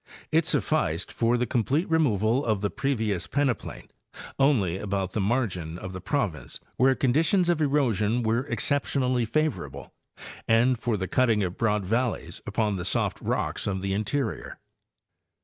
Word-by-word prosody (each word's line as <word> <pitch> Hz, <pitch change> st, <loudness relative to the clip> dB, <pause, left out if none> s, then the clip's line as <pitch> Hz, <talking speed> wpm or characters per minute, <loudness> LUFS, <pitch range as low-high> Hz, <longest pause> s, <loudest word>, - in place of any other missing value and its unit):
Ifsufficed 80 Hz, +4 st, +1 dB
for 120 Hz, +1 st, +1 dB
the 125 Hz, -, 0 dB
complete 130 Hz, -, 0 dB
removal 125 Hz, -, +2 dB
of 110 Hz, -4 st, 0 dB
the 100 Hz, -, -1 dB
previous 110 Hz, -10 st, -1 dB
peneplain 135 Hz, -2 st, -2 dB, 0.5 s
only 105 Hz, -, +2 dB
about 95 Hz, -2 st, -2 dB
the 105 Hz, -, -1 dB
mar 120 Hz, +6 st, +2 dB
gin 85 Hz, -5 st, -6 dB
of 95 Hz, +1 st, -7 dB
the 95 Hz, -, -6 dB
province, 95 Hz, -, -2 dB, 0.2 s
where 130 Hz, +2 st, +4 dB
conditions 160 Hz, +8 st, +2 dB
of 170 Hz, -2 st, +1 dB
erosion 120 Hz, -6 st, +1 dB
were 115 Hz, +5 st, 0 dB
exception 140 Hz, -1 st, 0 dB
ally 125 Hz, -2 st, +1 dB
favorable, 155 Hz, +5 st, -2 dB, 0.5 s
and 120 Hz, +2 st, +3 dB
for 115 Hz, -3 st, -1 dB
the 95 Hz, -1 st, -3 dB
cutting 115 Hz, -4 st, +2 dB
of 90 Hz, 0 st, -3 dB
broad 105 Hz, -3 st, 0 dB
valleys 110 Hz, -6 st, -2 dB
upon 105 Hz, -1 st, 0 dB
the 90 Hz, -, -4 dB
soft -, -, 0 dB
rocks -, -, -2 dB
of 95 Hz, -1 st, -2 dB
the 95 Hz, 0 st, -1 dB
interior. 110 Hz, +4 st, -2 dB
115 Hz, 150 wpm, -26 LUFS, 100-135 Hz, 0.5 s, where